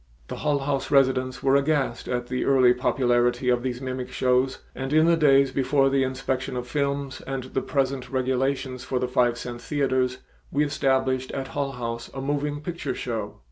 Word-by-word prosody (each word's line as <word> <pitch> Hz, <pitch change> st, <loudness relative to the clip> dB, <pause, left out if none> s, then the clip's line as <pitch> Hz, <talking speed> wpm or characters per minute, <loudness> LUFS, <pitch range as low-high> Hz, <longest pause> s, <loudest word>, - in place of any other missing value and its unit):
The -, -, -5 dB
Hull 150 Hz, -1 st, +1 dB
House 135 Hz, 0 st, -2 dB
residents 130 Hz, -2 st, +2 dB
were 135 Hz, 0 st, +4 dB
aghast 140 Hz, -4 st, +1 dB
at 125 Hz, -1 st, -2 dB
the 125 Hz, +1 st, -2 dB
early 130 Hz, -3 st, +5 dB
popularity 125 Hz, 0 st, +1 dB
of 125 Hz, -1 st, +2 dB
these 125 Hz, 0 st, -3 dB
mimic 130 Hz, -1 st, -4 dB
shows, 130 Hz, +1 st, +1 dB, 0.2 s
and 135 Hz, +1 st, -5 dB
in 155 Hz, +1 st, +5 dB
the 170 Hz, 0 st, +5 dB
days 140 Hz, -4 st, +4 dB
before 135 Hz, 0 st, +2 dB
the 135 Hz, 0 st, +2 dB
inspection 130 Hz, 0 st, -2 dB
of 125 Hz, 0 st, -4 dB
films 140 Hz, -1 st, -2 dB
and 135 Hz, -1 st, -3 dB
the 130 Hz, +1 st, -3 dB
present 135 Hz, -2 st, -1 dB
regulations 130 Hz, 0 st, -1 dB
for 130 Hz, -, -2 dB
the 125 Hz, -, 0 dB
five 120 Hz, -1 st, +2 dB
cent 120 Hz, 0 st, -6 dB
theaters 130 Hz, -3 st, 0 dB, 0.3 s
we 150 Hz, +1 st, +2 dB
established 130 Hz, -2 st, 0 dB
at 135 Hz, -1 st, -4 dB
Hull 140 Hz, -1 st, -2 dB
House 115 Hz, -1 st, -5 dB
a -, -, -4 dB
moving 145 Hz, +1 st, -2 dB
picture 170 Hz, +2 st, -4 dB
show. 110 Hz, -4 st, -4 dB
130 Hz, 180 wpm, -25 LUFS, 125-140 Hz, 0.3 s, early